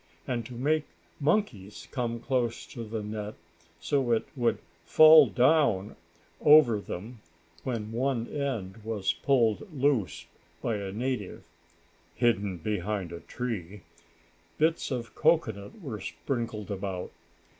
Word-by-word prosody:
And 120 -2 -2
to 125 - -9
make 150 +5 +1 0.3
monkeys 140 - -1
come 120 -3 -2
close 120 -2 -1
to 120 -4 -8
the 110 -1 -4
net, 105 0 -5 0.4
so 135 0 0
it 115 - +1
would 120 -3 +1 0.3
fall 155 -2 +8
down 120 -4 +2 0.5
over 145 -8 +7
them, 105 +5 -7 0.4
when 110 -4 -3
one 120 0 -1
end 120 -10 -3
was 105 -3 -1
pulled 130 - +1
loose 135 - 0 0.3
by 115 -3 -1
a 100 -1 -5
native 120 -2 -3 0.7
(hidden 105 -4 +1
behind 100 0 -3
a 85 - -6
tree) 105 -6 -5 0.8
bits 160 +2 +1
of 120 -3 -4
cocoanut 150 - +1
were 110 - -5
sprinkled 115 -3 -4
about. 95 -2 -4
115 Hz, 120 wpm, -28 LUFS, 105-135 Hz, 0.8 s, fall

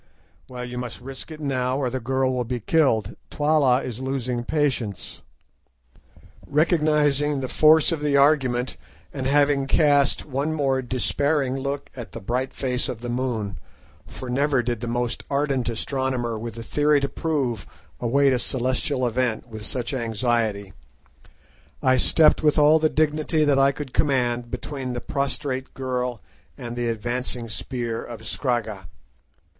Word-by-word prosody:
"Well, 125 -1 -6
you 125 0 -6
must 125 -2 -6
risk 130 +3 -7
it 155 -1 -9
now, 130 -3 -1
or 130 -3 -1
the 130 - -2
girl 130 +2 0
will 125 -1 0
be 120 +1 -3
killed. 115 - +1
Twala 145 -4 +2
is 120 -2 -5
losing 130 -2 -2
patience." 125 - -2 1.3
Recognising 150 -2 +2
the 130 - -3
force 155 +4 +5
of 160 -3 -2
the 145 -1 +2
argument, 130 -4 +2 0.4
and 130 -2 -2
having 140 -1 +3
cast 145 -2 +3
one 145 +2 -2
more 135 -3 +1
despairing 130 +2 0
look 140 +1 -4
at 120 -3 -8
the - - -6
bright 125 +6 -2
face 125 -1 -1
of 115 - -5
the 120 0 -4
moon, 120 -6 -2 0.5
for 130 - -8
never 135 0 +1
did 120 -1 -2
the 120 - -5
most 120 0 -2
ardent 140 -3 0
astronomer 125 0 -2
with 115 0 -6
a 115 - -6
theory 150 +4 +2
to 140 - -1
prove 135 -9 -2 0.3
await 135 +3 +3
a 125 - +1
celestial 130 +2 0
event 120 -1 -1
with 110 -2 -8
such 120 +4 -2
anxiety, 115 -4 -1 1.1
I 130 0 +4
stepped 155 +5 +5
with 150 0 +3
all 150 +1 +6
the 155 0 +2
dignity 155 0 +1
that 140 -2 +3
I 135 0 +5
could 140 -2 -8
command 125 -4 +1
between 130 -2 -5
the 120 - -3
prostrate 140 -1 -2
girl 125 -3 -3 0.3
and 120 0 -6
the 120 -1 -1
advancing 120 +1 -3
spear 115 - -3
of 115 -2 -9
Scragga. 110 - -2
130 Hz, 150 wpm, -24 LUFS, 120-145 Hz, 1.3 s, all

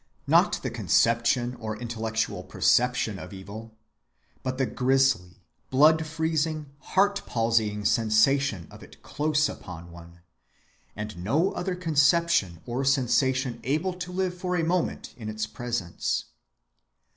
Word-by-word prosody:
Not - - +3
the - - -2
conception 120 +1 +2
or 110 -1 -4
intellectual 115 -1 -3
perception 120 -5 +1
of 90 - -9
evil, 110 +4 -10 0.6
but 130 0 -3
the 135 - +1
grisly 125 -9 +1 0.3
blood‐freezing 160 +1 +2 0.3
heart‐palsying 115 - +1
sensation 110 - +2
of - - -13
it - - -16
close 150 0 +1
upon 85 -1 -9
one, 85 0 -14 0.7
and 105 -4 -6
no 155 - +2
other 180 0 -3
conception 155 - +2
or 125 +3 -2
sensation 130 -2 +1
able 155 +8 0
to 180 0 -7
live 185 0 -1
for 180 0 -2
a 170 - +1
moment 175 +1 -1
in 110 -3 -6
its 110 0 -3
presence. 110 -5 -3
125 Hz, 120 wpm, -26 LUFS, 110-155 Hz, 0.7 s, Not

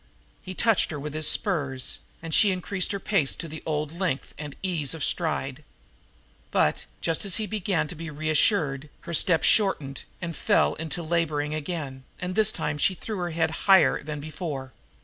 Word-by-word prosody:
He 185 - -8
touched 225 0 +3
her 150 - -4
with 150 +1 -5
the 155 - -3
spurs, 145 -6 +2 0.2
and 165 -1 -5
she 210 - +6
increased 185 +1 -1
her 200 - -2
pace 185 -9 +1
to 165 - -5
the 155 0 -8
old 150 -1 -1
length 170 -5 -2
and 150 -1 -7
ease 165 -6 0
of 155 - -4
stride; 150 -4 -1 0.9
but, - - +1
just 165 +4 0
as 200 -3 +4
he 220 - +1
had 210 - -6
begun 195 -6 0
to 150 - -7
be 165 0 -7
reassured, 150 -1 +1
her 170 - -7
step 165 0 +4
shortened 150 -10 +2
and 170 -3 -4
fell - - +2
to 165 +2 -4
laboring 155 -3 0
again, 150 -4 -4 0.2
and 180 0 -3
this 215 +1 +3
time 150 - -3
she 190 - +3
threw 215 +3 -5
her 175 -1 -2
head 160 -1 0 0.2
higher 195 -2 +6
than 150 0 -5
before. 145 -3 -5
160 Hz, 185 wpm, -26 LUFS, 150-185 Hz, 0.9 s, she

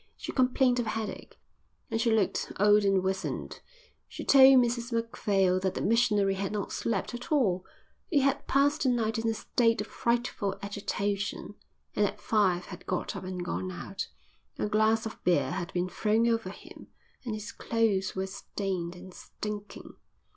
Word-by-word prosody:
She - - -5
complained 255 -1 +3
of 235 - -1
headache, 215 -2 -5 0.5
and 225 - 0
she 230 - +2
looked 220 -4 +1
old 210 +1 +5
and 195 -2 +3
wizened. 190 0 -3 0.5
She - - -8
told 270 -1 +8
Mrs 240 -1 +1
Macphail 200 -5 +1
that 190 0 -1
the - - -2
missionary 210 -3 +3
had 195 0 -3
not 210 -1 -3
slept 225 0 -2
at 240 +4 -7
all; 200 -12 +2 0.5
he 290 -5 +3
had 275 +1 0
passed 285 +2 +2
the 265 - +3
night 225 -2 0
in 225 0 0
a 225 - -1
state 230 0 +1
of - - -1
frightful 235 -4 -1
agitation 200 0 -3 0.4
and 210 - +2
at 205 +2 -7
five 190 -5 +1
had - - -11
got 180 - -2
up - - -6
and 180 -1 -4
gone 185 +1 -3
out. 185 +2 -5 0.5
A - - -1
glass 220 +1 +2
of 220 - -7
beer 180 -1 +2
had 175 -1 -4
been 180 0 -1
thrown 220 +4 +1
over 225 -4 0
him 195 - -12 0.4
and 230 -4 -3
his 215 0 -6
clothes 215 -4 0
were 190 0 -1
stained 190 -2 -4
and 185 +1 -11
stinking. 210 +1 -8
210 Hz, 170 wpm, -29 LUFS, 190-230 Hz, 0.5 s, told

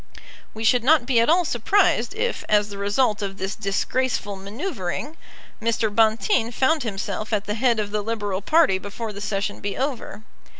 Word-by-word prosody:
We 220 - -5
should 240 +1 +3
not 290 -1 +4
be 245 -2 +3
at 230 - +3
all 350 +2 +4
surprised 320 - +2
if, 480 +2 -2
as 210 -1 +3
the 200 -1 -8
result 210 +2 +1
of 195 -1 -4
this 190 +1 -3
disgraceful 205 +1 -1
manoeuvring, 205 - -5 0.5
Mr. 225 -1 0
Bonteen 225 - +2
found 275 +6 +2
himself 215 -1 -4
at 210 -2 0
the 210 - -2
head 235 0 +2
of 205 -1 -2
the 210 0 -1
Liberal 205 -3 -3
party 300 - +3
before 210 +3 -6
the 200 - -8
Session 205 0 -2
be 200 -1 -4
over. 260 -5 -4
220 Hz, 175 wpm, -23 LUFS, 205-260 Hz, 0.5 s, not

